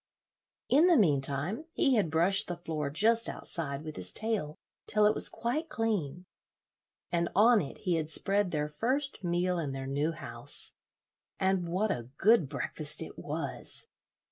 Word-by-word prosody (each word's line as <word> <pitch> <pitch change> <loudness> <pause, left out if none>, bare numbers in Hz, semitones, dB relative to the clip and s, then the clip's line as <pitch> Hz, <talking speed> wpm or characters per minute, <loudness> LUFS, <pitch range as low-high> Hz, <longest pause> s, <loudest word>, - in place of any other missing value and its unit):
In 305 +7 +5
the 345 -3 +5
mean 150 - +3
time 145 - 0
he 270 - +2
had 210 -9 +2
brushed 170 +5 +3
the 175 - -4
floor 155 -4 -4
just 225 +9 +3
outside 140 -4 -5
with 155 -1 -8
his 90 -1 -3
tail 210 - -1 0.3
till 210 0 +2
it 210 - +4
was - - +6
quite 305 +8 -3
clean, 195 - -2 0.9
and 170 0 0
on 225 +3 +5
it 145 - -7
he 180 -4 -1
had 155 -1 -3
spread 195 +5 0
their 150 -3 -2
first 255 - -1
meal 175 0 0
in 145 -5 -3
their 135 0 -5
new 145 +4 -1
house. 115 -6 -5 0.7
And 190 -2 0
what 195 +4 0
a 120 -5 -4
good 210 - +4
breakfast 145 +2 0
it - - -11
was! - - -6
175 Hz, 165 wpm, -30 LUFS, 150-215 Hz, 0.9 s, was